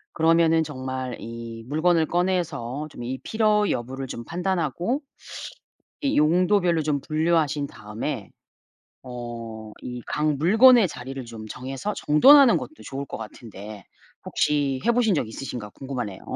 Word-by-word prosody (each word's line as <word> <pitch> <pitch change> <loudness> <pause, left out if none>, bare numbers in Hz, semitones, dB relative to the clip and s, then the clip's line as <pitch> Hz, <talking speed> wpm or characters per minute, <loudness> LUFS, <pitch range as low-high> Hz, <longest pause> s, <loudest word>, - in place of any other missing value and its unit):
그러면은 165 0 +4
정말 130 -3 -5
이 115 0 -8
물건을 160 +2 +2
꺼내서 160 -7 -1
좀 120 - -9
이 130 +2 -3
필요 215 -2 +2
여부를 130 +3 -3
좀 120 -1 -6
판단하고 180 - -1 1.0
이 280 -2 0
용도별로 175 +1 +3
좀 145 -2 0
분류하신 155 -2 +1
다음에 105 +2 -5 0.7
어 115 -3 -7
이 125 -1 -6
각 150 0 0
물건의 220 - +6
자리를 135 0 -7
좀 110 -2 -9
정해서 135 - -5
정돈하는 265 - +7
것도 310 - -7
좋을 135 +1 -5
것 - - -7
같은데 105 -2 -9 0.4
혹시 140 -3 0
해 - - +5
보신 225 -5 +3
적 120 - -1
있으신가 120 -3 -6
궁금하네요. 125 -8 -5
145 Hz, 285 characters per minute, -24 LUFS, 120-175 Hz, 1.0 s, 정돈하는